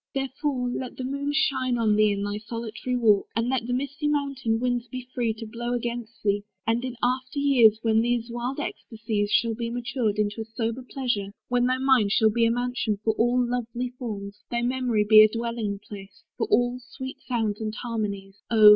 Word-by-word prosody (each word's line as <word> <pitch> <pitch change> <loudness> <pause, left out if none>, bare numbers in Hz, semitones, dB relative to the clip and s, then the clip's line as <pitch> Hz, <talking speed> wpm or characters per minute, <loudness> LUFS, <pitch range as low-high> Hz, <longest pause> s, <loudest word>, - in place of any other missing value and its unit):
Therefore 270 -1 -1
let 250 0 -5
the 260 - -4
moon 280 +2 -2
Shine 280 -5 +1
on 220 -2 +3
thee 215 0 +4
in 200 0 -2
thy 205 +1 -2
solitary 230 +3 -4
walk; 215 -5 +4
And 230 +2 +1
let 255 -3 0
the 245 - -1
misty 280 +4 -2
mountain 275 -6 0
winds 245 0 -1
be 255 +1 -7
free 235 -2 +1
To 225 +1 -7
blow 240 +2 -4
against 235 -1 -4
thee: 205 0 +2 0.2
and 230 +2 +1
in 255 -1 -4
after 255 +3 0
years, 250 -7 +5
When 225 -1 +3
these 240 0 0
wild 245 +4 -3
ecstasies 220 -6 -3
shall 230 +2 +2
be 230 +1 -3
matured 240 -3 -1
Into 210 +1 0
a - - -5
sober 230 +1 -1
pleasure, 240 -6 -3
when 245 0 +2
thy 255 0 +2
mind 260 -6 +3
Shall 220 -1 +4
be 230 +1 +3
a - - +2
mansion 245 -3 -1
for 220 - +2
all 245 +3 +2
lovely 245 0 -2
forms, 205 -4 -5
Thy 235 0 -1
memory 245 -4 +1
be 215 0 +9
as 215 - +7
a 230 - -5
dwelling 230 -4 -2
place 200 -1 -11
For - - -1
all 245 - +2
sweet 260 +2 -8
sounds 225 -4 -1
and 215 0 -3
harmonies; 205 -5 -4
Oh! 215 -2 +8
235 Hz, 200 wpm, -26 LUFS, 220-250 Hz, 0.2 s, be